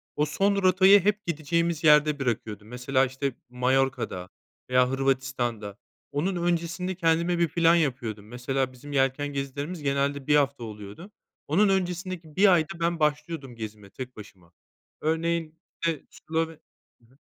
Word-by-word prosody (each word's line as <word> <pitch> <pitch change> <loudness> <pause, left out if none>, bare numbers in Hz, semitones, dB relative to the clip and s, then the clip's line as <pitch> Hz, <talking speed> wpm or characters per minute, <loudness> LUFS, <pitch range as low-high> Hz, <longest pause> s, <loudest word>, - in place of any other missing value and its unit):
O 150 - +2
son 195 +7 +1
rotayı 190 +2 +7
hep 210 +1 +1
gideceğimiz 170 0 -1
yerde 150 -1 +5
bırakıyordum. 110 -4 -3
Mesela, 130 +2 +1
işte, 130 0 -3
Mallorca'da 125 -7 0 0.4
veya 125 0 +4
Hırvatistan'da. 130 -6 -1 0.3
Onun 180 +7 -1
öncesinde 175 +1 -1
kendime 170 0 +1
bir 170 - +3
plan 170 +1 +4
yapıyordum. 120 -9 -1
Mesela, 130 +2 -2
bizim 145 +4 -11
yelken 135 +1 +1
gezilerimiz 145 +4 -4
genelde 140 0 0
1 150 - +5
hafta 140 -4 +1
oluyordu. 105 - -9 0.4
Onun 195 +7 +3
öncesindeki 180 -3 -2
1 195 -1 +6
ayda 165 0 0
ben 170 0 0
başlıyordum 150 -3 -1
gezime 105 -2 -8
tek 125 +4 -8
başıma. 95 -5 -14 0.5
Örneğin, 160 0 -1 0.2
işte, 165 -2 -1
Slove 160 +1 -3 0.5
Hı - - -25
hı. 130 +4 -26
145 Hz, 140 wpm, -26 LUFS, 125-170 Hz, 0.5 s, rotayı